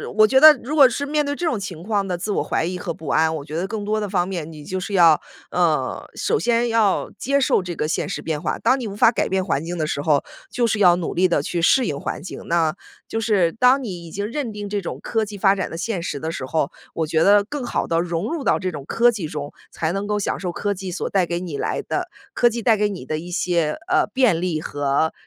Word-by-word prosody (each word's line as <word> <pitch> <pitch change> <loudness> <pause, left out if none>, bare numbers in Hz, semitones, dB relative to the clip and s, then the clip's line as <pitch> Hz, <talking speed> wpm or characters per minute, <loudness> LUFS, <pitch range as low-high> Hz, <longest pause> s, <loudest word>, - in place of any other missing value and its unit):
我 215 0 +6
觉 265 +4 +4
得 310 +2 +10
如 280 +6 -3
果 280 -4 +8
是 280 +3 -3
面 300 +1 0
对 285 0 -2
这 350 - -3
种 245 -10 0
情 180 -5 -6
况 200 -2 -1
的 180 -1 -2
自 205 +4 -3
我 - - 0
怀 - - -1
疑 180 +2 -3
和 180 -2 -4
不 160 -3 -11
安， 160 0 +2
我 140 - -7
觉 155 - -7
得 180 +3 -1
更 210 0 -4
多 215 +1 0
的 210 - -2
方 180 -2 0
面， 170 -5 -4
你 155 -2 -11
就 185 +5 -4
是 200 +2 -5
要， 165 -4 +6 0.3
呃， - - 0
首 455 - 0
先 235 0 +1
要 220 -4 +1
接 280 +2 +1
受 260 - +2
这 180 -1 -6
个 155 - -1
现 160 - -1
实 200 - -4
变 155 -1 -3
化。 135 -6 -2
当 265 +1 +2
你 235 - -4
无 200 - -6
法 225 +2 +5
改 - - -1
变 190 0 0
环 160 -5 -1
境 175 +1 -4
的 155 - 0
时 145 - -2
候， 145 -1 +2 0.3
就 245 - +1
是 220 - 0
要 175 -3 +6
努 175 -2 -3
力 185 +2 +3
地 170 -5 +1
去 170 +1 -2
适 255 +8 +4
应 140 -1 -3
环 - - -4
境。 - - -7
那 165 -2 +1 0.3
就 225 - -2
是 200 -7 +2
当 255 +5 +3
你 175 -6 -6
已 - - -11
经 200 +1 -3
认 270 -6 -3
定 205 -1 -6
这 205 0 -1
种 170 - -6
科 225 -2 -1
技 205 -1 -8
发 195 0 +4
展 190 - -3
的 165 - -6
现 190 0 -2
实 145 -4 -4
的 160 +2 -3
时 130 - -5
候， 150 0 -1 0.2
我 160 - -1
觉 160 0 +1
得 200 0 +6
更 280 +3 -5
好 - - -1
地 165 0 +1
融 175 - -2
入 320 -5 -3
到 - - +2
这 185 -1 -2
种 145 -3 -8
科 240 +6 +3
技 195 -8 -4
中， 150 -1 -6 0.2
才 160 0 -2
能 195 +2 -3
够 210 0 0
享 - - -2
受 180 -2 -3
科 205 +3 -2
技 185 -1 -6
所 175 - -3
带 190 -3 +2
给 170 0 -2
你 165 -6 -5
来 - - -2
的 - - -3 0.3
科 240 - +4
技 235 0 -4
带 225 -1 +3
给 210 0 +2
你 185 -10 -7
的 155 +2 -3
一 175 +2 -9
些， 170 -4 0
呃， - - +3
便 250 -11 +3
利 170 -3 -1
和 145 +2 0
190 Hz, 300 characters per minute, -22 LUFS, 165-220 Hz, 0.3 s, 得